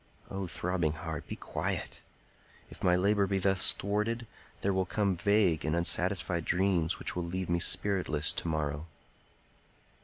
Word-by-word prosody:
O 95 -1 -3
throbbing 85 -2 -1
heart, 80 -1 -6
be - - -5
quiet! - - -3 0.7
If - - -12
my 90 -1 +4
labor 100 +2 +2
be 95 0 0
thus 95 0 +4
thwarted, 105 +4 -2 0.4
there 100 - +1
will 95 -1 0
come 100 -2 +1
vague 100 -3 +2
and 80 +1 0
unsatisfied 85 0 +1
dreams 90 -3 +1
which - - -3
will 90 - -1
leave 90 +1 -3
me 85 - +2
spiritless 90 -4 +1
to - - -4
morrow." 75 -1 -2
90 Hz, 150 wpm, -31 LUFS, 85-100 Hz, 0.7 s, my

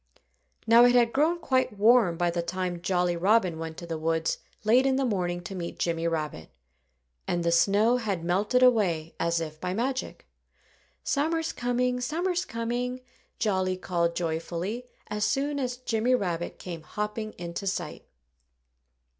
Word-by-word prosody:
Now, 230 +2 +7
it 245 0 +5
had 235 -1 +4
grown 315 +5 +2
quite 260 -9 0
warm 215 -5 +5
by 175 0 +1
the 170 0 -1
time 180 0 -3
Jolly 180 -1 +1
Robin 185 -2 +2
went 160 0 -6
to 170 - -7
the 165 -2 -4
woods 160 0 0 0.2
late 245 +5 +4
in 265 - +2
the 270 0 +1
morning 175 -6 -1
to 185 - -7
meet 175 -2 -5
Jimmy 165 -1 -1
Rabbit. 155 - -3 0.8
And 175 -1 0
the 170 - +2
snow 205 +8 +4
had 200 -8 -2
melted 205 +8 +2
away 180 -10 +3
as 170 0 +1
if 155 -1 -6
by 180 0 -2
magic. 255 +4 -3 0.8
"Summer's 320 +3 0
coming! 250 +1 0
Summer's 350 +7 -1
coming!" 245 +2 -3 0.4
Jolly 185 -3 0
called 170 -2 -1
joyfully 175 +8 -3 0.2
as 210 0 -2
soon 285 +3 0
as 250 -2 -2
Jimmy 245 0 +1
Rabbit 175 -7 -3
came 170 -3 -7
hopping 210 +5 -4
into 175 +3 -5
sight. 175 -5 -3
200 Hz, 155 wpm, -27 LUFS, 170-245 Hz, 0.8 s, Now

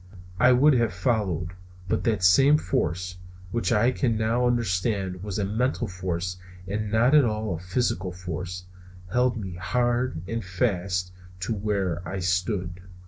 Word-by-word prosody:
I 125 - +6
would 140 +4 +5
have 115 -7 +1
followed, 95 -5 0 0.4
but - - -1
that 110 -6 +1
same 135 +11 +6
force, 90 - -2 0.3
which 120 +1 -1
I 120 +3 +4
can 120 -3 0
now 115 +3 +1
understand 100 -5 0
was 100 0 -4
a 100 - 0
mental 120 +7 0
force 90 0 -3 0.3
and 105 +2 -3
not 115 +5 +4
at 150 -2 +7
all 110 -3 -1
a 80 - -4
physical 95 0 -1
force, 90 0 -6 0.5
held 125 +1 +2
me 95 -5 -6
hard 120 -1 0
and 115 -1 -3
fast 90 -1 -1 0.3
to 90 - -1
where 100 -5 -1
I 95 - -5
stood. 90 0 -1
100 Hz, 150 wpm, -26 LUFS, 90-120 Hz, 0.5 s, at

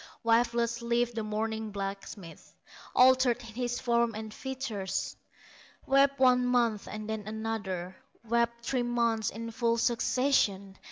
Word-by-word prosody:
Wifeless 235 0 +2
lived 235 0 0
the 225 - -2
mourning 220 +1 -3
blacksmith, 195 -3 -7 0.4
Altered 255 -1 +5
in 230 -2 -11
his 245 +1 -2
form 235 -2 +1
and 220 0 -6
features; 255 -8 -4 0.7
Wept 275 +1 +4
one 250 -1 +5
month 240 -4 +1
and 215 0 -6
then 220 -1 -4
another, 210 -5 -4 0.3
Wept 235 0 0
three 255 -2 0
months 235 -2 +1
in 230 +2 -6
full 230 0 +1
succession. 230 -5 +1
230 Hz, 125 wpm, -30 LUFS, 215-245 Hz, 0.7 s, Altered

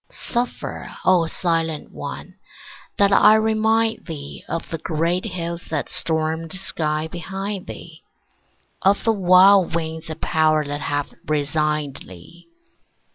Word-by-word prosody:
Suffer, 245 0 -4
O 180 -3 +4
silent 165 -3 -1
one, - - -7 0.6
that 200 0 +4
I 210 +2 +7
remind 220 +1 +1
thee 145 -4 -7
Of 165 - -4
the 165 - -3
great 170 +4 -1
hills 170 -3 -4
that 155 -3 -3
stormed 160 -2 0
the 185 - -4
sky 155 -4 -1
behind 195 +3 -5
thee, - - -10 0.8
Of 195 +1 +3
the 225 - +3
wild 185 -2 +5
winds 160 -1 -3
of 160 0 -6
power 155 -2 +2
that 145 +1 -4
have 145 -1 -2
resigned 150 -1 0
thee. 95 - -12
165 Hz, 130 wpm, -22 LUFS, 155-190 Hz, 0.8 s, I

